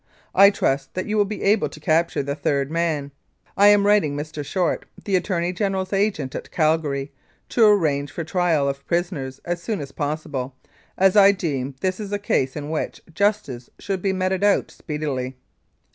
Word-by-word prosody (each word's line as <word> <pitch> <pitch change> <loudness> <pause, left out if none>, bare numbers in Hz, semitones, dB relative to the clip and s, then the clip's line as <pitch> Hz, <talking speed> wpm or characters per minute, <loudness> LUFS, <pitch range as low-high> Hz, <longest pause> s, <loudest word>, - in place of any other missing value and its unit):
I 200 +1 +8
trust 135 -8 -1
that 185 - -2
you 215 - -2
will 205 -1 +3
be 210 +1 -5
able 205 +1 +3
to 150 - -12
capture 160 0 +1
the 140 +1 -2
third 140 -1 -1
man. 160 -4 -1 0.4
I 200 - +6
am 205 -1 +6
writing 200 -9 +3
Mr. 150 0 -5
Short, 180 +4 -1 0.2
the 200 - +1
Attorney 180 -1 0
General's 190 0 -2
agent 195 -9 0
at - - -6
Cal 160 0 +2
gary, 140 -2 -4 0.4
to 225 -3 +5
arrange 150 -9 +2
for 170 - -4
trial 165 -4 +1
of 140 0 -3
prisoners 165 -7 -2
as 175 0 -2
soon 215 +1 -3
as 140 -2 -7
possible, 145 -3 -4 0.4
as 190 +1 +4
I 200 -1 +8
deem 140 -8 -3
this 185 +1 -1
is 205 -2 -6
a 205 - 0
case 135 -10 0
in 150 +1 -5
which 160 - -3
justice 200 - -1
should 195 -2 -3
be 195 - +1
meted 190 0 -1
out 205 -1 +2
speedily. 140 -4 -4
170 Hz, 185 wpm, -22 LUFS, 145-195 Hz, 0.4 s, I